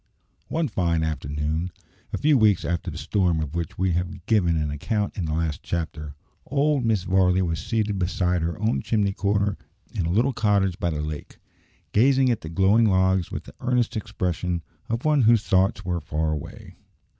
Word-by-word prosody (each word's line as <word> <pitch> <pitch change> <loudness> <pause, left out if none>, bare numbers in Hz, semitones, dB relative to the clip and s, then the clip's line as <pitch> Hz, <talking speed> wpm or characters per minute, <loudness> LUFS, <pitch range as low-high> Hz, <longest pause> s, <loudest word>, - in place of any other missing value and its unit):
One 160 -1 0
fine 85 - 0
afternoon, 75 +2 -2 0.4
a - - -2
few 150 0 +3
weeks 105 -6 +4
after 85 0 -2
the - - -7
storm 85 +1 +1
of 75 -2 -4
which 85 -2 -4
we 95 0 +1
have 90 +1 -3
given 90 -7 +2
an 75 -1 -1
account 105 +8 -2
in 90 - -2
the 80 - -2
last 80 -2 -1
chapter, 80 -3 -4 0.3
old 145 -1 +1
Mrs. 110 -5 +1
Varley 95 0 +3
was 80 -5 -2
seated 105 -3 -1
beside 90 -1 0
her 85 +1 -2
own 110 +3 +1
chimney 100 -3 0
corner 100 0 0 0.3
in 95 -7 -1
the - - -1
little 120 +9 +2
cottage 100 -5 +1
by 85 - 0
the 75 -2 -2
lake, 75 -1 -6 0.5
gazing 130 +3 +4
at 115 - -1
the 80 - -7
glowing 95 +6 +4
logs 95 -1 +2
with - - -4
the - - -13
earnest 125 -1 0
expression 90 -5 -2 0.3
of 115 +4 -2
one 150 -2 +4
whose 115 -2 +5
thoughts 95 +2 +2
were 90 -2 -1
far 75 +1 -1
away. 75 -2 -7
95 Hz, 185 wpm, -24 LUFS, 85-110 Hz, 0.5 s, whose